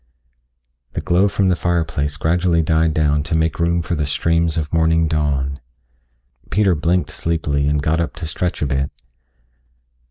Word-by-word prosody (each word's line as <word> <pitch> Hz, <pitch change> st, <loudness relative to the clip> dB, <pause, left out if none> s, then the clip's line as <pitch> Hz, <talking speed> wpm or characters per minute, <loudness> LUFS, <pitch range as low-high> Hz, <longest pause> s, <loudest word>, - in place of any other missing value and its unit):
The -, -, -3 dB
glow 90 Hz, +3 st, +3 dB
from 100 Hz, -1 st, +1 dB
the 90 Hz, -, +3 dB
fireplace 80 Hz, -4 st, -1 dB
gradually 85 Hz, +1 st, +1 dB
died 80 Hz, -1 st, +1 dB
down 75 Hz, -1 st, +2 dB
to 80 Hz, +2 st, -1 dB
make 80 Hz, 0 st, 0 dB
room 85 Hz, 0 st, +1 dB
for 80 Hz, -, -3 dB
the 75 Hz, -3 st, -1 dB
streams 85 Hz, +2 st, +1 dB
of 80 Hz, 0 st, -3 dB
morning 80 Hz, 0 st, +3 dB
dawn. 70 Hz, -3 st, -1 dB, 0.9 s
Peter 100 Hz, -3 st, +3 dB
blinked 85 Hz, 0 st, 0 dB
sleepily 75 Hz, -3 st, -1 dB
and 75 Hz, 0 st, 0 dB
got 80 Hz, +2 st, +1 dB
up 85 Hz, -, -2 dB
to 80 Hz, -, -5 dB
stretch 85 Hz, +2 st, -2 dB
a -, -, +1 dB
bit. 70 Hz, 0 st, -1 dB
80 Hz, 160 wpm, -19 LUFS, 75-85 Hz, 0.9 s, glow